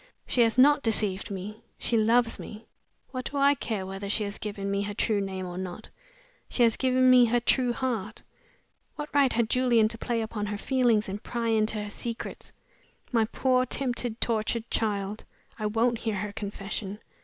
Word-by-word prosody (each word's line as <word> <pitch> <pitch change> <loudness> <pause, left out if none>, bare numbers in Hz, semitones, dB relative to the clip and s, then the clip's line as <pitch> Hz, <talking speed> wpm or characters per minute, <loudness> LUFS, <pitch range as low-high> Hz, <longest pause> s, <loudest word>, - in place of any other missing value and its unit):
She 245 - +1
has 230 0 +3
not 290 +3 +6
deceived 210 -5 +2
me 200 +2 -6 0.2
she 235 - -1
loves 230 +1 +3
me! 215 +1 -9 0.5
What 255 -2 -5
do 285 - -5
I 280 +1 +5
care 220 -8 -3
whether 195 +1 -6
she 210 +1 +1
has 200 0 -5
given 200 -2 -4
me 200 0 0
her 205 0 -4
true 210 -1 +1
name 190 -1 -4
or 180 0 -6
not! 185 +3 -7 0.6
She 245 - +2
has 230 -2 +4
given 255 0 +3
me 250 -1 +7
her 240 +1 +2
true 245 +1 +2
heart. 230 -4 -3 0.7
What 295 0 -7
right 280 -3 +4
had 235 -1 +1
Julian 240 -2 +3
to 230 - -7
play 235 -1 -1
upon 215 -1 -4
her 205 0 -3
feelings 240 -3 +2
and 200 +2 -5
pry 235 -1 -2
into 215 -1 +1
her 205 - -7
secrets? 235 +2 -6 0.6
My 230 -3 +3
poor, 255 +3 +1
tempted, 245 -3 -2
tortured 230 0 -1
child! 205 -1 -1 0.4
I 215 - 0
won't 230 +2 +1
hear 225 -3 -2
her 205 +1 -3
confession. 200 -1 -5
225 Hz, 185 wpm, -27 LUFS, 205-245 Hz, 0.7 s, me